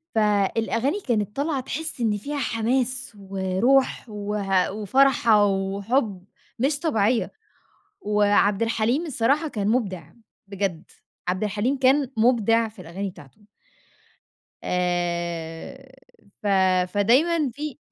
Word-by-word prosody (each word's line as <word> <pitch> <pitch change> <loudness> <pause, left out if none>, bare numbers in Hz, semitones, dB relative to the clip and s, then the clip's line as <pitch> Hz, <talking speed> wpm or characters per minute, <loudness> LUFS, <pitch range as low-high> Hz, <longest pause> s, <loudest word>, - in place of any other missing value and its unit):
فالأغاني 225 - +1
كانت 215 - -2
طالعة 285 0 -1
تحِسي 280 0 -4
إن 215 -2 +1
فيها 285 +8 -5
حماس 245 0 -1
وروح 195 +8 +1
وه 205 -3 -1
وفرحة 220 0 +3
وحُب 195 +1 -1 0.3
مش 280 +4 +1
طبيعية. 230 -7 +1 0.7
وعبد 205 0 +2
الحليم 230 +7 0
الصراحة 280 +3 +1
كان 210 -7 -2
مُبدع 190 - -1 0.4
بجد، 195 -3 -3 0.4
عبد 185 +3 0
الحليم 215 +7 -1
كان 265 0 +3
مُبدع 230 -1 +3
في 215 -3 -13
الأغاني 190 +4 -5
بتاعته. 150 +2 -16 1.2
آآ 175 +6 -3 0.5
ف - - -1 0.5
فدايمًا 275 - +3
في 295 +1 -6
220 Hz, 100 wpm, -24 LUFS, 195-260 Hz, 1.2 s, وفرحة